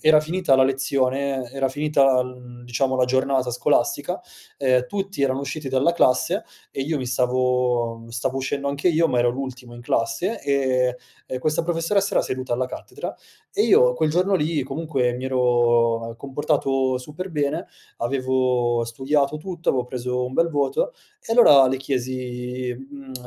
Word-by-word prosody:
era 155 -1 +6
finita 165 -1 +1
la 130 - +5
lezione 135 -1 0
era 135 -1 0
finita, 140 -1 +2
uhm, 125 -1 -8
diciamo 130 +2 0
la 130 - +3
giornata 130 0 +1
scolastica 125 - 0 0.4
ehm, 130 -2 +2
tutti 195 -5 -3
erano 135 0 +1
usciti 140 +1 -5
dalla 135 +6 +2
classe 170 - +2 0.3
e - - -5
io 155 +3 -1
mi 130 - -4
stavo 125 -2 0
stavo 125 +3 -2
uscendo 140 +1 -2
anche 140 +5 0
io, 165 -1 +3
ma 125 - +1
ero 120 0 +3
l'ultimo 125 -1 -7
in 120 - -10
classe 120 - -1
e 130 -3 +1 0.3
e 130 - -2
questa 155 +3 0
professoressa 175 +4 0
era - - +4
seduta 130 -1 -3
alla 130 +2 0
cattedra, 125 - -7 0.4
e - - +2
io 125 0 +5
quel 155 +5 0
giorno 180 +5 +2
lì 155 -4 0
comunque 135 -3 -1
mi 125 +2 -4
ero 120 -2 +2
comportato 135 -1 0
super 150 +9 -7
bene, 145 -5 -2 0.3
avevo 125 -1 +1
studiato 140 +5 0
tutto 175 +1 -6
avevo 125 -2 +2
preso 125 0 -3
un 125 - -5
bel 165 +5 +2
voto 160 - 0 0.3
e 225 - -4
allora 145 - +7
le 135 - 0
chiesi, 125 -1 -3
mhmm: 135 0 -11
130 Hz, 160 wpm, -23 LUFS, 125-145 Hz, 0.4 s, allora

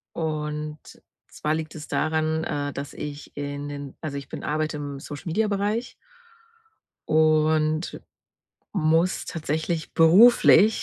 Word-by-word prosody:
und 150 -1 -3 0.5
zwar 150 +1 -2
liegt 155 0 -4
es 155 -1 -9
daran, 160 0 0
äh, 145 -1 -2
dass 140 +1 -6
ich 145 0 -8
in 145 0 -4
den 140 -1 -7
also, 145 -3 -5
ich 140 - -7
bin - - -7
arbeite 155 +1 -1
im 145 -1 -6
Social 145 +4 -8
Media 210 +6 +1
Bereich. 205 +4 -1 1.2
Und 155 +1 +2 0.7
muss 165 0 +2
tatsächlich 160 0 -3
beruflich 210 +5 +6
155 Hz, 120 wpm, -25 LUFS, 145-165 Hz, 1.2 s, beruflich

